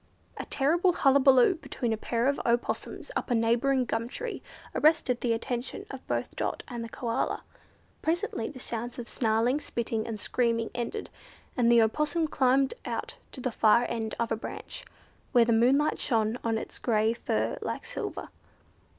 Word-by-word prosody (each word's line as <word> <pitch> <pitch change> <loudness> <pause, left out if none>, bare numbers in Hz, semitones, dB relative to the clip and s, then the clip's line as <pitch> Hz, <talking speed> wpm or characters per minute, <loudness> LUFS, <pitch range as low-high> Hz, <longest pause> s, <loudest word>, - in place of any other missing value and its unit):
A - - -4
terrible 340 +6 +2
hullabaloo 270 0 +5
between 235 -4 -2
a - - +1
pair 230 +2 -1
of 280 - +1
Opossums 240 - -1
up - - -2
a 245 - +2
neighbouring 240 +3 +2
gum 230 +1 -2
tree 480 - -5 0.3
arrested 280 -5 +3
the 240 - +1
attention 240 +2 -3
of - - -9
both - - -2
Dot - - -2
and 240 -2 -5
the 230 - -7
Koala. 230 0 -2 0.6
Presently 335 - -1
the 280 - -10
sounds 240 -1 -5
of 240 -1 -6
snarling, 230 +3 +1
spitting, 230 -5 -3
and 220 -2 -4
screaming 230 -1 0
ended, 245 - -4 0.4
and 235 -2 +3
an 235 - +7
Opossum 300 +8 +2
climbed 270 -1 +2
out - - -4
to - - -7
the 255 - -1
far 225 +2 +4
end 225 -2 -3
of 235 -1 -1
a - - +3
branch, 220 - -7 0.5
where 240 -2 +6
the 230 - +2
moonlight 265 +7 +3
shone 225 -1 +1
on 225 -1 +1
his - - -7
grey 220 -1 +2
fur 235 - -1
like - - -4
silver. - - -5
240 Hz, 165 wpm, -28 LUFS, 230-270 Hz, 0.6 s, an